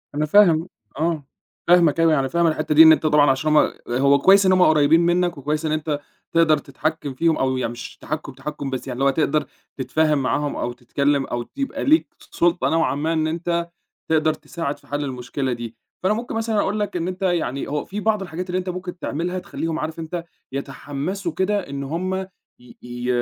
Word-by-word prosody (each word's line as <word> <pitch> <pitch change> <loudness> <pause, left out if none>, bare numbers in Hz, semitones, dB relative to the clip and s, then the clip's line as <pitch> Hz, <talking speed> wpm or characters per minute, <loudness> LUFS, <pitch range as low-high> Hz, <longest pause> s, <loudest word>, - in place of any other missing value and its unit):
أنا 150 +1 +1
فاهم 170 -1 +5 0.3
آه، 160 -2 0 0.4
فاهمك، 170 -3 +5
أنا 165 - +5
يعني 155 -3 +3
أنا 135 - 0
فاهم 170 +6 +1
أنا 160 -1 +2
الحِتّة 150 - 0
دي 160 - +10
إن 160 - +9
أنت 160 - +3
طبعًا 150 -2 +5
عشان 155 +3 +1
هُم، - - +4 0.2
هو 140 +3 +3
كويس 195 +6 +6
إن 185 - +5
هُم 185 0 +4
قريّبين 155 -1 +5
منك 175 -1 +1
وكويس 150 +3 -2
إن 155 - 0
أنت 155 -1 -1 0.3
تقدَر 165 -2 +4
تتحكِّم 145 +1 -4
فيهم 165 +4 +1
أو 130 -1 0
يع 130 - -1
مش 120 +1 -8
تحكُّم، 155 -2 -5
تحكُّم، 140 +1 -6
بس 130 0 -5
يعني 125 0 -5
لو 140 - +4
تقدَر 150 +1 +1 0.3
تتفاهم 150 +3 +1
معاهم 145 +2 -1
أو 120 - -2
تتكلّم 140 +3 0
أو 120 0 -4
يبقى 280 0 -3
ليك 310 +3 +4
س - - -19
سُلطة 175 0 +2
نوعًا 165 -3 +1
ما 155 +3 -1
إن 155 -1 +1
أنت 170 +1 -2 0.4
تقدَر 155 -1 +3
تساعد 155 -1 -5
في - - -24
حَل 145 0 -3
المشكلة 130 0 -3
دي، 120 -1 -6 0.3
فأنا 190 +3 +2
ممكن 235 +2 -5
مثلًا 225 -1 -1
أقول 210 +2 -1
لك 205 -2 -2
إن 170 0 -2
أنت 185 +1 -6
يعني، 170 -8 -1
هو 150 0 -2
في 205 +2 -5
بعْض 215 -1 +1
الحاجات 180 0 -5
اللي 180 - 0
أنت 185 0 -4
ممكن 180 0 -5
تعملها 175 +3 -3
تخلّيهم، 165 -2 -4
عارف 160 +1 -4
أنت 165 +1 -5 0.3
يتحمّسوا 145 +6 -4
كده 190 +1 -1
إن 140 0 -4
هُم 175 +6 -2 0.5
ي 125 - -16
ي 120 0 -6
155 Hz, 210 wpm, -22 LUFS, 140-175 Hz, 0.5 s, دي